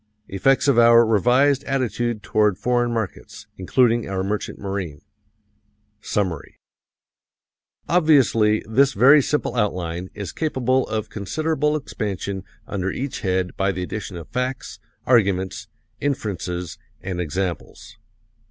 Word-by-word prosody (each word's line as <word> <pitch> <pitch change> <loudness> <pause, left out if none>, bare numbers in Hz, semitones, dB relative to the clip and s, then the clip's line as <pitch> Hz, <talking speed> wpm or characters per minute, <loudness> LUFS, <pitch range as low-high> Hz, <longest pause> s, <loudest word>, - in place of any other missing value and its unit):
Effects 135 +9 +2
of 135 -4 +4
our 115 0 +7
revised 125 +6 +3
attitude 120 -4 -1
toward 105 -2 +2
foreign 120 -1 0
markets, 110 -6 -5
including 120 +4 +2
our 95 -1 -2
merchant 105 +2 -3
marine. 95 -7 -5 1.0
Summary. 95 -9 -3 1.3
Obviously, 135 -10 +3
this 135 +5 +3
very 135 +8 +6
simple 150 0 -1
outline 90 -5 -2
is 100 -3 -5
capable 130 -4 0
of 110 -1 -3
considerable 150 - -1
expansion 100 -8 -4 0.2
under 95 -2 -3
each 135 +6 -4
head 95 -2 -1
by 95 0 +1
the 90 -1 -4
addition 95 -1 -6
of 85 - -9
facts, 125 +2 -4 0.3
arguments, 100 -6 +1 0.3
inferences 90 - -3 0.2
and 90 -2 -4
examples. 90 +2 -5
110 Hz, 115 wpm, -22 LUFS, 95-130 Hz, 1.3 s, our